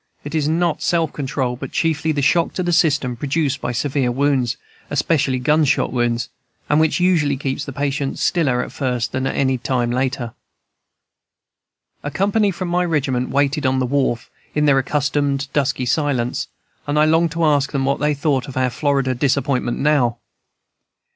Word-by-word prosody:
It 145 - -7
is 155 -2 +1
not 165 +1 0
self 165 -3 +1
control, 130 -3 -2
but 135 +1 -7
chiefly 160 -1 0
the 145 -2 -1
shock 165 +4 +2
to 185 - -1
the 175 0 0
system 145 -7 +2
produced 140 +1 -1
by - - -2
severe 130 +1 0
wounds, 130 -2 +1 0.3
especially 145 -2 +1
gunshot 150 +2 +2
wounds, 120 -1 0 0.4
and 150 - +3
which 160 +1 +2
usually 165 -6 +2
keeps 135 +1 -3
the 140 - -6
patient 140 0 -2
stiller 135 -8 +1
at - - -8
first 125 -3 -2
than 130 +1 -1
any 130 -2 0
later 125 +1 0
time. - - -12 1.7
"A 145 - -4
company 200 +6 +1
from 185 -1 -4
my 180 +1 +1
regiment 135 -7 0
waited 140 +1 +1
on 130 0 +1
the 130 - +1
wharf, 130 -2 -1 0.2
in 150 0 +2
their 140 -2 +4
accustomed 140 0 0
dusky 140 -3 0
silence, 130 -3 0 0.4
and 145 +1 0
I 150 - +5
longed 165 +1 +2
to 165 0 -1
ask 145 -2 +2
them 135 -2 -1
what 140 +1 0
they 150 0 +1
thought 140 -3 0
of 135 - -8
our 130 -1 +1
Florida 135 -2 0
disappointment 130 -1 0
now? 135 -5 +2
140 Hz, 170 wpm, -20 LUFS, 130-150 Hz, 1.7 s, I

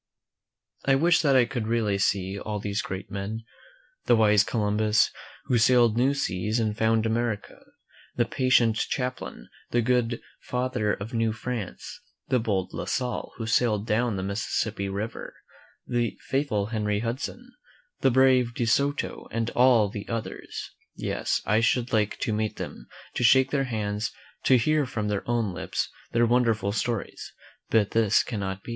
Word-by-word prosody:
I 135 - +4
wish 165 +5 +4
that 140 -4 +3
I 125 -2 +6
could 120 -4 -3
really 110 -4 +1
see 95 0 0
all 105 0 -4
these 100 0 -2
great 95 +1 -6
men 105 +3 -4 0.3
— - - -34
the - - +6
wise 105 -2 +5
Columbus, 105 0 +2 0.3
who 120 - +1
sailed 120 -1 +5
new 130 +4 +2
seas 105 -3 -1
and 110 -2 0
found 110 0 +2
America; 115 -2 -2 0.6
the 120 - +2
patient 120 -2 +3
Champlain, 125 - -3 0.2
the 120 -1 +1
good 120 -1 +1 0.2
Father 125 -4 -1
of 105 +5 -5
New 115 -1 +1
France; 110 -3 -6 0.3
the 130 -2 +3
bold 100 -5 -1
La - - -4
Salle, 125 -1 -2
who 115 - -4
sailed 110 -2 +2
down 115 0 +1
the 95 - -3
Mississippi 100 0 -2
River; 100 +4 -5 0.5
the 120 -2 -1
faith 140 +2 0
ful 105 -2 0
Henry 105 -2 0
Hudson, 135 - -4 0.5
the - - +4
brave 130 -2 +4
De 120 - 0
Soto, 140 +5 0
and 115 0 -2
all 120 -4 +5
the 100 +1 -7
others. 115 -2 -5 0.2
Yes, - - -1
I 110 - +3
should 120 +2 +1
like 105 -2 +1
to 110 - 0
meet 110 0 -1
them, - - -7 0.3
to - - -1
shake 130 +2 +5
their 135 -2 +1
hands, 105 -3 -2 0.3
to 130 - +6
hear 150 +3 +2
from 110 -4 -3
their 105 -1 -1
own 115 -5 0
lips 95 0 -3 0.2
their 120 0 +3
wonderful 115 -4 +2
stories; 115 +1 -3 0.4
but 110 -3 +2
this 110 -2 +3
cannot 95 -4 -4
be. - - -10
115 Hz, 165 wpm, -26 LUFS, 105-125 Hz, 0.6 s, I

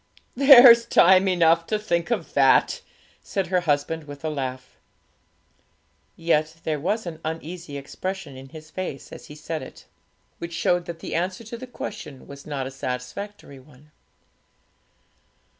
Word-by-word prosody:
'There's 245 -3 +8
time 190 +2 +5
enough 170 -2 +3
to 215 - 0
think 170 -4 -1
of 235 - -2
that,' - - +4 0.4
said 195 -2 -2
her 180 +1 +1
husband, 155 -1 -1
with 145 +1 -10
a 155 - -1
laugh. 130 -3 -5 1.4
Yet 160 -1 0
there 155 -2 -2
was 210 +8 -1
an 165 -2 -7
uneasy 160 -1 -6
expression 165 +2 -6
in 135 +1 -11
his 155 +1 -12
face 185 -7 -6
as - - -11
he 150 - -11
said 155 +1 -5
it, 130 - -12 0.5
which 170 0 -6
showed 175 +1 +1
that 170 -1 -8
the - - -6
answer 185 +5 -2
to 225 +2 -8
the 255 +2 -9
question 205 - -8
was 140 +1 -12
not 140 -3 -3
a 135 - -6
satisfactory 135 +6 -6
one. 145 +2 -20
165 Hz, 150 wpm, -24 LUFS, 145-190 Hz, 1.4 s, There's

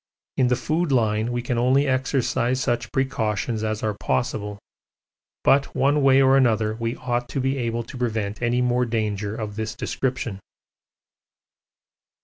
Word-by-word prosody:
In 130 - +3
the 125 - +3
food 155 +7 -1
line 110 -2 +1
we 120 0 -2
can 120 -1 -1
only 130 +4 +3
exercise 130 -1 0
such 120 -3 -1
precautions 110 -4 -1
as 110 0 -2
are 105 -1 0
possible, 100 +10 -2 0.9
but 140 +1 +3
one 140 +2 +3
way 135 0 +5
or 135 0 +5
another 110 -5 +3
we 115 +1 -3
ought 120 -1 -2
to - - -3
be 135 +1 0
able 120 -1 -1
to 120 - -10
prevent 110 -3 -2
any 120 +1 +1
more 125 0 +2
danger 105 -2 -2
of 110 -2 -5
this 110 0 -3
description. 125 -4 -3
120 Hz, 150 wpm, -23 LUFS, 110-130 Hz, 0.9 s, way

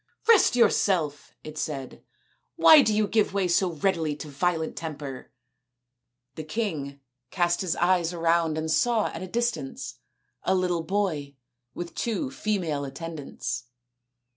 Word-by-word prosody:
" - - -30
Rest 420 - +5
yourself," 175 -10 +2
it 155 0 -7
said; 135 -5 -5 0.3
" - - -38 0.2
why 315 -2 +8
do 220 -5 +2
you 210 0 +2
give 210 -3 +1
way 195 -2 +2
so 175 0 +2
readily 160 -2 0
to 150 +1 -8
violent 160 +2 -1
temper? 145 -5 -7 0.5
" 125 +1 -56
The 155 - -4
king 155 -7 -3 0.3
cast 175 -2 +1
his 185 -3 -1
eyes 175 -1 +2
around 165 -2 +1
and 160 0 -2
saw 230 +4 +2
at - - -7
a 185 - -5
distance 185 - -3 0.4
a - - +1
little 180 -2 0
boy 160 -6 -2 0.4
with 175 -1 -6
two 250 +4 -2
female 180 - -1
attendants. 140 -4 -5
165 Hz, 145 wpm, -26 LUFS, 145-195 Hz, 0.5 s, why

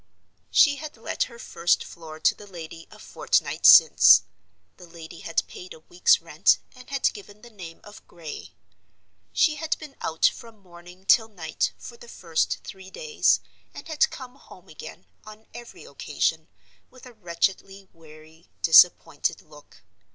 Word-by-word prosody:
She 285 -2 +4
had 305 -4 -9
let 225 - -3
her 235 - -14
first 175 -6 -1
floor 160 -2 -12
to - - +3
the 205 - -15
lady 165 -3 -11
a - - -16
fortnight - - 0
since. - - +7 0.5
The 180 - -15
lady 165 0 -12
had 165 - -2
paid 180 - -12
a - - -16
week's 175 +3 +2
rent, - - +2 0.2
and 250 -1 -16
had 275 -1 0
given 205 0 -14
the 240 - -14
name 175 -6 -12
of 205 0 -15
Gray. 165 -4 -10 0.8
She 305 -3 +1
had 320 +1 -3
been 300 -3 -12
out 160 - -1
from 230 -2 -2
morning 180 -1 -17
till 220 +2 +4
night, 175 -7 -4
for 235 - -12
the 240 - -15
first 165 -7 -3
three 190 -1 -11
days, 460 - 0 0.3
and - - -10
had 315 -2 +1
come 255 0 -11
home 185 -8 -18
again, 155 +3 -12 0.2
on 215 +1 -14
every 240 0 -12
occasion, - - -3 0.4
with 255 0 -17
a 250 - -14
wretchedly 195 0 -3
weary, 160 0 -18
disappointed 170 +2 +4
look. - - -19
190 Hz, 160 wpm, -24 LUFS, 165-235 Hz, 0.8 s, since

